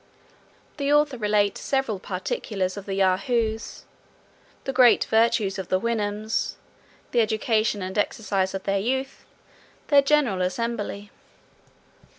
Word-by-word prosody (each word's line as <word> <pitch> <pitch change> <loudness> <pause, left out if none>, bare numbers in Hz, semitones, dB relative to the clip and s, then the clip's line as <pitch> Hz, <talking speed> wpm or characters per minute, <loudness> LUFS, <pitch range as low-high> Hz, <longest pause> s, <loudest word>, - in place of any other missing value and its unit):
The 285 -1 0
author 295 -4 +3
relates 210 -1 +1
several 265 -7 -1
particulars 185 0 -3
of 200 -1 -8
the 195 - -2
Yahoos. 220 +4 0 0.8
The 270 - -3
great 250 -2 +6
virtues 220 -3 +2
of 190 - -5
the 185 - +1
Houyhnhnms. 215 -1 -2 0.6
The 240 - +3
education 215 -1 0
and 185 +1 -5
exercise 195 -2 -1
of 190 - -5
their 195 0 0
youth. 265 +5 -3 0.6
Their 285 -1 +7
general 275 -9 +2
assembly. 205 +1 -3
215 Hz, 120 wpm, -24 LUFS, 195-235 Hz, 0.8 s, Their